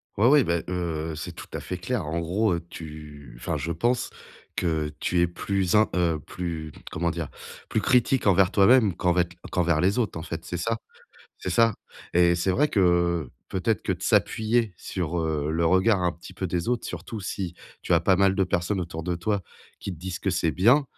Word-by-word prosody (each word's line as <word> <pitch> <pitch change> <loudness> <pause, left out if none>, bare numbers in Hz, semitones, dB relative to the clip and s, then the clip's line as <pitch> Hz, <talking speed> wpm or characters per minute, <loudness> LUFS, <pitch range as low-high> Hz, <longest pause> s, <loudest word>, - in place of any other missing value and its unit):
Ouais, 105 - +2
oui, 145 +1 +6
bah, 85 -4 0
heu, 85 -3 -2
c'est 85 +3 -6
tout - - -9
à - - -3
fait 90 - -5
clair. 100 +2 -2
En 80 +2 -1
gros, 90 +5 +1
heu, 85 0 -3
tu 75 -4 -10
enfin - - -3
je 80 +4 -3
pense 120 +10 0 0.5
que 80 -3 0
tu 90 - 0
es 85 - +4
plus 95 +2 -1
in 110 +1 +5
heu, 85 -3 +1
plus, 80 -1 -5 0.2
comment 85 +1 0
dire? 80 -3 -4 0.4
Plus - - +1
critique 125 +1 +3
envers 95 -2 +5
toi-même 105 -1 +5
qu'envec 90 -1 +1
qu'envers 85 -3 +2
les 95 +8 +2
autres, 105 -9 -1
en 80 - -5
fait, 80 -1 -5
c'est 90 - -4
ça? 115 +6 -1 0.6
C'est 95 - -4
ça? 115 +3 +4 0.4
Et 85 0 +5
c'est 85 +2 0
vrai 140 +11 +3
que, 105 - 0
heu, 85 -5 +2 0.2
peut-être 95 +4 0
que - - 0
de - - -7
s'appuyer 110 -2 +2
sur, 85 -2 -3
heu, 80 -2 -1
le 85 +1 +1
regard 95 +3 +3
un 90 - +2
petit 85 0 -12
peu 95 - -3
des 85 0 -2
autres, 120 -1 0
surtout 110 - -6
si 95 -2 -4 0.3
tu - - -1
as - - +5
pas 95 - +3
mal 95 0 +4
de 95 - +2
personnes 90 +2 0
autour 85 -2 -5
de 90 - -1
toi 100 +4 -1 0.4
qui 100 - -5
te - - -15
disent 90 +1 -5
que 95 - -1
c'est 85 -2 +1
bien, 120 - +4
90 Hz, 210 wpm, -26 LUFS, 85-100 Hz, 0.6 s, oui